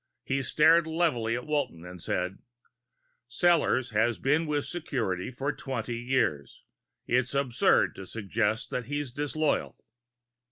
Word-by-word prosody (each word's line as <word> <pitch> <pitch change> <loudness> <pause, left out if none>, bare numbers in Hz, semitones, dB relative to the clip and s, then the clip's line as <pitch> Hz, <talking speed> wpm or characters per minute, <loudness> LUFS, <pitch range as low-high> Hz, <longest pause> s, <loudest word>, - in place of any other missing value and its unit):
He 135 +1 -1
stared 160 +4 +4
levelly 155 -9 +1
at 120 - -5
Walton 140 - -2
and 90 -1 -9
said, 90 +3 -2 0.9
"Sellors 155 -4 +2
has 110 +2 +2
been 150 +4 +1
with 145 -1 0
security 125 - -3
for 135 +4 -3
twenty 120 -3 -4
years. 120 - -1 0.4
It's 125 +2 +1
absurd 130 -4 +3
to 95 - -8
suggest 110 +2 -1
that 125 - -2
he's 145 -2 -3
disloyal." 145 +3 -1
125 Hz, 125 wpm, -28 LUFS, 115-145 Hz, 0.9 s, stared